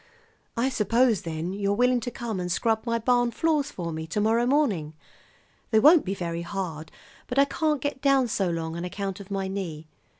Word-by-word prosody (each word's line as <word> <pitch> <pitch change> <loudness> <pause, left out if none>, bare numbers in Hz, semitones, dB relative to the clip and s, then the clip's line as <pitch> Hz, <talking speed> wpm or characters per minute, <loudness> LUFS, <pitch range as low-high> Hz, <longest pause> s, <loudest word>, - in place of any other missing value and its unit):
"I 250 +3 +2
suppose, 230 -1 +2
then, 165 +2 -4
you're 200 0 0
willing 250 +2 +3
to 240 - -4
come 230 -4 -4
and 180 0 -3
scrub 225 +5 0
my 230 0 +1
barn 245 +1 +2
floors 300 +2 0
for 170 -8 -5
me 160 0 -5
to 165 - -2
morrow 225 +3 +2
morning. 210 - +1 0.7
They 220 - +4
won't 305 +6 +6
be 195 +1 -2
very 170 -2 -3
hard, 170 -4 -5 0.4
but 250 - -4
I 275 - +6
can't 300 0 -1
get 285 -2 -3
down 275 -3 +3
so 195 -5 0
long 165 -1 -3
on 170 - -4
account 195 +1 -4
of 200 -1 -11
my 195 -1 -2
knee. 175 -5 -5
210 Hz, 200 wpm, -26 LUFS, 175-250 Hz, 0.7 s, won't